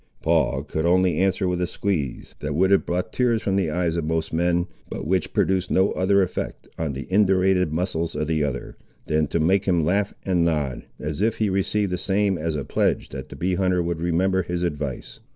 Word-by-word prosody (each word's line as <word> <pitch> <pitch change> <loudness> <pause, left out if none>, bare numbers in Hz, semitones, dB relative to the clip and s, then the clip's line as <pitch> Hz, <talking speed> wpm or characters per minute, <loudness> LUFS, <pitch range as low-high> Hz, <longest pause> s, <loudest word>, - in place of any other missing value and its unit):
Paul 65 - +2
could 80 +1 -3
only 90 -1 +3
answer 95 0 +1
with 90 0 -1
a 90 - +1
squeeze, 80 -10 -3
that 75 -1 -3
would 95 +4 +3
have 100 - +3
brought 90 +1 -2
tears 120 -3 +1
from 95 - 0
the 95 -5 +1
eyes 85 0 0
of 85 - -1
most 80 +1 -2
men, 85 +1 +2 0.2
but - - -5
which 90 +1 0
produced 95 -1 +1
no 95 +1 +3
other 100 +1 +3
effect 90 - -4
on 80 -3 -2
the 70 +2 -5
indurated 95 -3 +3
muscles 85 -1 -2
of 75 +1 -1
the 80 -1 0
other, 70 -3 -4 0.3
than 75 -1 +1
to 85 - -1
make 95 +5 +2
him 85 -5 +2
laugh 100 +4 0
and 90 -3 +2
nod, 75 -7 -1
as 75 +4 -4
if 110 +1 +1
he 105 -3 +1
received 100 +1 0
the 90 - -1
same 100 0 +1
as 80 -1 -2
a 70 - -3
pledge - - 0
that 65 0 -7
the - - -9
bee 90 +2 -1
hunter 90 -1 +1
would 85 -1 -3
remember 95 +3 +2
his 90 0 -3
advice. 75 -6 -4
90 Hz, 215 wpm, -24 LUFS, 80-95 Hz, 0.3 s, only